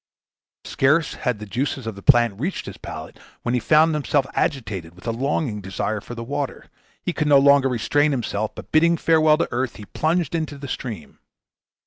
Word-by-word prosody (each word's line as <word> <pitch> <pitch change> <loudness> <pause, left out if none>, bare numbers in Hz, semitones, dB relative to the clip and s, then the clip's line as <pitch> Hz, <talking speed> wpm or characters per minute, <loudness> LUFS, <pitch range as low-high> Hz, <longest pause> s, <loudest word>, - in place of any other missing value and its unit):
Scarce 150 +3 +2
had 125 -4 -2
the 105 - -8
juices 130 +4 -3
of 110 - -3
the 100 - -11
plant 120 -4 +4
reached 175 +9 -3
his - - -7
palate - - -8 0.2
when 120 - -1
he 125 - +2
found 155 +7 +4
himself 145 -2 +1
agitated 95 - -2
with 90 - -16
a 115 - 0
longing 125 -2 -1
desire 100 +2 -3
for 120 - -9
the 115 - -5
water. 140 +2 -4 0.4
He 180 - -2
could 150 -2 -1
no 145 -1 +7
longer 140 -1 +5
restrain 145 +5 +2
himself, 110 -6 -2
but - - -10
bidding 170 +2 +4
farewell 155 -1 +4
to - - 0
earth, 125 0 -2
he 105 - -10
plunged 160 - -1
into 155 -3 -2
the 140 0 -8
stream. 115 - -6
135 Hz, 190 wpm, -22 LUFS, 115-150 Hz, 0.4 s, no